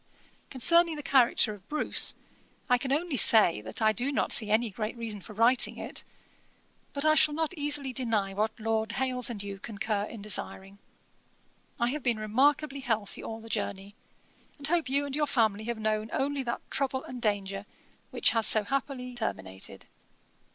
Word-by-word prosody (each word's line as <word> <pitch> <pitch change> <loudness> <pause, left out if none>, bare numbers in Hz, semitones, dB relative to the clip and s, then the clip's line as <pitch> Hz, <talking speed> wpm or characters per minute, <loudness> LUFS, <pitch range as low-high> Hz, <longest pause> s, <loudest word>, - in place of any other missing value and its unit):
Concerning 335 +5 +3
the 295 - -7
character 245 -5 +3
of 200 -1 -15
Bruce, 305 - +4 0.6
I 250 - +4
can 265 +1 -4
only 305 0 -1
say, 210 - +7
that 110 - -5
I 215 - +5
do 245 +6 -1
not 275 - -1
see 215 -3 +3
any 220 +1 +1
great 215 +3 -5
reason 220 -3 -5
for 215 - -12
writing 235 +4 +3
it; - - -4 0.9
but 280 +1 -3
I 310 - +5
shall 310 -1 +4
not 320 +2 -2
easily 290 -3 0
deny 220 -6 -1
what 215 +3 -2
Lord 220 0 -2
Hailes 250 -1 -1
and 210 -4 -6
you 200 -1 -7
concur 210 -1 -3
in 215 -2 -10
desiring. 200 -1 -3 1.0
'I 235 0 +1
have 295 +3 -4
been 240 -3 0
remarkably 275 +6 +1
healthy 220 -6 -3
all 225 0 -7
the 225 - -12
journey, 200 -2 -4 0.6
and 285 - -8
hope 325 -2 0
you 280 +2 +1
and 280 -1 -5
your 300 0 0
family 220 -5 0
have 235 0 -3
known 215 0 -2
only 280 +1 -1
that 240 -2 -6
trouble 265 -1 -1
and 250 -1 -9
danger 200 -2 -2 0.4
which - - +2
has 225 -2 +4
so 215 - +6
happily 255 +1 -4
terminated. 95 - -6
235 Hz, 175 wpm, -28 LUFS, 215-275 Hz, 1.0 s, say